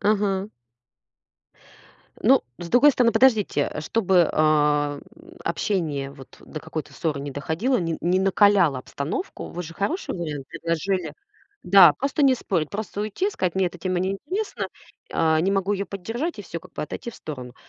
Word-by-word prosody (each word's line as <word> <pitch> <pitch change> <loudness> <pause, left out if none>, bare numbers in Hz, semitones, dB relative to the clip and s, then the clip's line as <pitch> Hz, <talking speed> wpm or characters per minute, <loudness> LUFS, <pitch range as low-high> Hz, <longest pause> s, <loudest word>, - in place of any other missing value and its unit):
Ага. 200 -1 +1 1.7
Ну - - +5 0.2
с 175 - -7
другой 260 +9 +6
стороны, 245 -3 +3
подождите, 225 - +3
э, - - -4
чтобы, 185 -2 +2
ам, 150 -2 +2 0.4
общение 160 -5 -1
вот 135 -1 -14
до 155 - -8
какой-то 160 0 -6
ссоры 155 -5 -2
не 140 +1 -5
доходило, 160 - -1
не 165 -3 -2
не 180 +2 +2
накаляло 195 -6 +4
обстановку. 140 - -5
Вы 175 - -5
же 165 -1 -9
хороший 305 - -2
вариант 150 -6 -5
предложили. 170 +2 -2 0.5
Да, 180 -3 +8
просто 275 - -1
не 270 -2 +6
спорить. 175 -10 -2
Просто 205 0 -4
уйти, 215 - -1
и - - -4
сказать 185 - -2
мне 190 -1 +2
эта 180 0 -6
тема 185 +1 -1
неинтересна, 290 - -3 0.5
а, 160 -1 +2
не 190 +4 +1
могу 195 0 +1
её 200 0 -2
поддержать 225 - -4
и - - -7
всё, 170 -3 -6
как - - -17
бы - - -4
отойти 195 +9 -6
в - - -15
сторону. 125 -5 -8
185 Hz, 165 wpm, -24 LUFS, 155-205 Hz, 1.7 s, Да